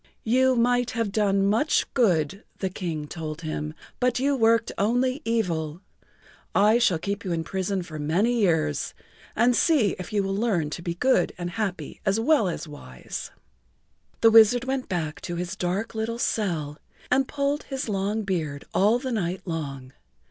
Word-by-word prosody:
"You 260 +3 +3
might 245 +1 +2
have 225 -3 0
done 195 -2 +2
much 220 +10 +2
good," 195 - +1
the 190 -1 -2
King 165 -5 -4
told 155 -1 -6
him, 155 -1 -4 0.2
"but 250 -1 +2
you 275 +2 +2
worked 230 -2 +3
only 250 +7 +1
evil. 170 -9 -1 0.8
I 215 +3 +5
shall 190 -8 +3
keep 200 +5 -4
you 185 - -3
in 165 -1 -1
prison 190 +1 -2
for 155 -3 -8
many 175 +11 +1
years 160 -7 +1 0.4
and 240 +2 +4
see 275 - +3
if 185 - -7
you 205 -2 +1
will 195 0 -2
learn 195 -9 0
to 170 - -5
be 170 0 -3
good 250 -2 +2
and 175 0 -4
happy 195 -2 -4
as 195 +3 +1
well 255 -3 +3
as 170 -1 -4
wise." 65 - -8 0.9
The 225 - +6
wizard 225 +2 +7
went 265 0 -2
back 160 -4 -3
to 175 -2 -4
his 175 +1 -4
dark 190 +5 -2
little 225 +1 -2
cell 165 -11 -1 0.3
and 265 +1 +3
pulled 285 +1 -1
his 270 -3 -4
long 205 +1 -1
beard 160 -8 -3
all 210 +5 +4
the 260 +1 -4
night 185 -4 -2
long. 140 -6 -5
200 Hz, 170 wpm, -25 LUFS, 170-230 Hz, 0.9 s, wizard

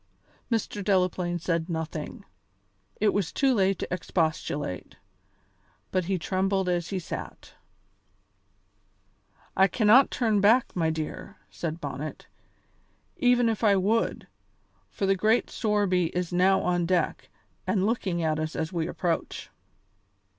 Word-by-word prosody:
Mr. 210 -2 -1
Delaplaine 180 -2 +1
said 165 0 -2
nothing. 160 -2 -5 0.7
It 210 - +3
was 200 -5 -1
too 270 -2 +2
late 195 -3 +2
to - - -4
expostulate, 155 - -2 1.0
but 185 -2 0
he 190 +1 0
trembled 190 +2 0
as 175 -1 -1
he 195 - -2
sat. 175 - -7 2.0
"I 190 - +5
cannot 230 +5 +5
turn 220 -5 +1
back, 225 +5 +4
my 165 -3 +1
dear," 160 -1 -5
said 165 -1 -4
Bonnet, 145 0 -6 0.9
"even 245 -1 +3
if 225 0 -1
I 205 -2 +5
would, 210 +4 0 0.6
for 195 - -3
the 195 - +4
great 215 +5 +2
Sorby 205 -5 +1
is 180 -1 -2
now 190 +2 +4
on 175 -1 0
deck, 180 -3 0 0.4
and 190 0 +1
looking 190 -6 -1
at 155 -1 0
us 155 0 -3
as 160 +2 -3
we 165 -2 -1
approach." 175 -1 -3
185 Hz, 125 wpm, -27 LUFS, 165-205 Hz, 2.0 s, I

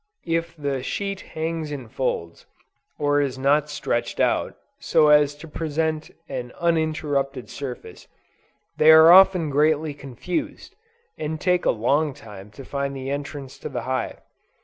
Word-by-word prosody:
If 165 0 -2
the 140 -3 -2
sheet 195 +7 -3
hangs 160 -1 -4
in 135 -5 -6
folds, 85 -9 -4 0.5
or 145 0 +2
is 135 -2 -2
not 145 +3 +2
stretched 120 -4 -2
out, - - +1 0.2
so 150 - +3
as 150 -1 +5
to 150 +3 -12
present 155 0 -2 0.2
an 125 -3 -5
uninterrupted 150 -5 -1
surface, 125 -10 -8 0.7
they 155 - +5
are 160 +1 +9
often 185 -4 +6
greatly 150 +1 +2
confused, 140 - -5 0.4
and 155 0 -3
take 180 +2 +1
a - - +3
long 140 +6 +1
time 105 -8 -12
to 130 +6 -12
find 140 0 -3
the 135 0 -5
entrance 140 -1 -6
to - - -6
the 120 - -4
hive. 130 +1 -3
145 Hz, 145 wpm, -23 LUFS, 135-160 Hz, 0.7 s, are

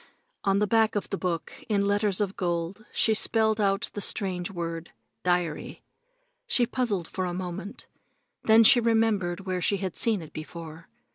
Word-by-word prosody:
On 195 0 +2
the 210 - +2
back 220 +1 +2
of 205 - -3
the 195 - -1
book 170 -5 -3 0.2
in 200 -2 +2
letters 205 -1 +2
of 200 -2 -1
gold 175 +2 -3
she 220 - +2
spelled 220 0 +2
out 200 +3 +1
the 205 - -4
strange 185 -3 0
word, 170 -2 -5 0.3
"Diary." 175 -3 -1 0.6
She 250 - +3
puzzled 230 -8 -1
for 185 - -4
a 175 -1 -3
moment, 185 +2 -6 0.6
then 225 +1 +6
she 240 - +7
remembered 220 -6 +1
where 185 -2 -3
she 200 - +1
had 190 -3 -4
seen 215 -7 +1
it 155 - -13
before. 160 +1 -9
195 Hz, 165 wpm, -27 LUFS, 175-215 Hz, 0.6 s, she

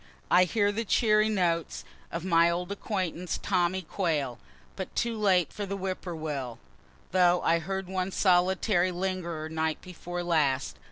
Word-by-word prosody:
I 180 +1 +6
hear 205 +2 +1
the 225 +3 -2
cheery 215 0 +3
notes 175 -5 0 0.3
of 170 +1 -4
my 170 -2 +4
old 175 +2 -2
acquaintance 185 -4 -3
Tommy 185 -1 0
quail; 150 - -1 0.4
but 190 - -6
too 235 -1 0
late 190 -6 +2
for 205 -1 -4
the 200 +1 -3
whip 190 -1 -3
poor 175 -2 -5
will, 140 -7 -4 0.5
(though 180 -1 +4
I 170 +1 +3
heard 190 +3 -4
one 185 0 -2
solitary 185 0 +3
lingerer 175 -3 -3
night 160 0 -1
before 175 0 -6
last.) 150 -6 +1
180 Hz, 155 wpm, -28 LUFS, 165-190 Hz, 0.5 s, I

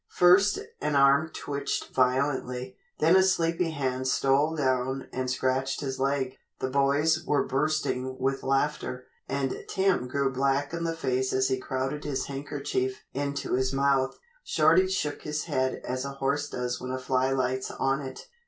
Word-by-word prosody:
First, 185 +3 +5 0.2
an 150 -1 0
arm 140 +3 +5
twitched 140 -2 -4
violently. 130 -1 0 0.2
Then 160 +4 +4
a 190 - +7
sleepy 170 -2 +1
hand 130 -4 -2
stole 140 +4 +2
down 130 -2 0
and 130 0 -2
scratched 130 +1 0
his 135 -2 -4
leg. 135 -1 0 0.2
The 130 - -3
boys 145 +4 +2
were 145 - +1
bursting 135 -2 -1
with 135 +1 -1
laughter, 135 -2 -1 0.2
and 135 -1 -2
Tim 190 -9 +1
grew 135 +1 0
black 140 +3 0
in 170 0 -2
the 165 0 -1
face 130 -4 -1
as 130 0 +2
he 130 0 0
crowded 135 +3 -3
his 135 -3 -2
handkerchief 140 -2 -3
into 140 0 -2
his 130 +1 +1
mouth. 135 -1 +2 0.3
Shorty 165 - +4
shook 170 -6 -2
his 150 0 -3
head 130 -4 -1
as 130 +1 -2
a 140 0 -5
horse 140 +2 -1
does 125 0 -3
when 125 - -5
a 130 - -2
fly 130 0 +1
lights 130 -1 0
on 135 +2 0
it. 135 - -8
135 Hz, 160 wpm, -27 LUFS, 130-150 Hz, 0.3 s, a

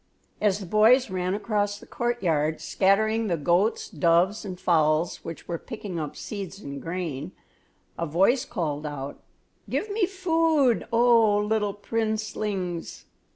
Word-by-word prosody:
As 205 -2 +3
the 195 - -7
boys 220 +5 +4
ran 185 0 -1
across 205 -1 -1
the - - -14
courtyard, 170 -11 0
scattering 215 +3 +2
the 175 -4 0
goats, 175 +8 +1
doves, 170 +3 +2
and 185 -3 -6
fowls 155 -1 +2
which 165 - -8
were 170 -1 -3
picking 205 -6 -6
up 150 -2 -5
seeds 195 -2 -6
and 140 -7 -7
grain, 165 -2 -4 0.7
a 170 - -1
voice 195 - +3
called 150 -3 -3
out: 140 -1 -6 0.5
"Give 420 - -2
me 405 -3 +1
food, 325 - +2
oh, 230 -3 +5
little 210 -1 0
princelings!" 210 -5 -3
200 Hz, 135 wpm, -26 LUFS, 170-220 Hz, 0.7 s, oh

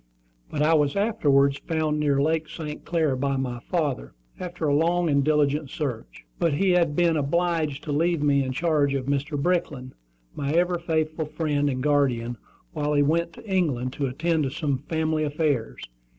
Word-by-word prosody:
But 150 - -1
I 160 +2 +4
was 150 -3 +2
afterwards 145 -10 +2
found 155 -2 0
near 145 -2 +2
Lake 155 +1 0
St. 150 -2 -7
Clair 160 -5 +1
by 140 +1 -1
my 125 -2 -3
father, 150 -1 -2 0.3
after 175 -3 -4
a 145 - +2
long 170 +2 +2
and 140 -1 +3
diligent 150 -1 +1
search. 110 - -5
But 165 -3 +2
he 190 +4 +2
had 170 -4 +2
been 170 -1 +3
obliged 155 -1 0
to 150 - -4
leave 165 +1 +1
me 140 -1 +3
in 130 - -3
charge 145 -1 +1
of 130 -2 -2
Mr. 140 +1 -1
Brickland, 150 -6 -1 0.4
my 140 +1 -2
ever 175 +1 +2
faithful 160 -1 -1
friend 150 -2 0
and 130 -2 -2
guardian, 125 -5 +1 0.4
while 150 0 -1
he 145 -1 +4
went 170 +3 0
to - - -13
England 145 -10 0
to 140 - -2
attend 160 +5 0
to - - -1
some 140 -1 -2
family 160 -1 0
affairs. 145 -5 -1
150 Hz, 180 wpm, -25 LUFS, 140-165 Hz, 0.4 s, I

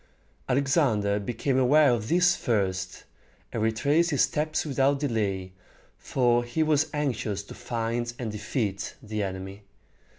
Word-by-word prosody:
Alexander 125 -7 +2
became 120 +5 -1
aware 140 +2 +5
of 115 -2 -1
this 175 +1 +4
first, 95 -4 -1 0.5
and 115 - -2
retraced 140 +10 +2
his 145 -5 +3
steps 155 +1 -1
without 140 -1 +1
delay, 100 -9 -1 0.4
for 120 -2 +1
he 120 +7 0
was 155 -1 +2
anxious 120 -9 -2
to - - -11
find 120 0 -3
and 115 -4 -4
defeat 105 -1 -3
the 110 -1 -3
enemy. 95 +1 -5
120 Hz, 130 wpm, -27 LUFS, 105-140 Hz, 0.5 s, aware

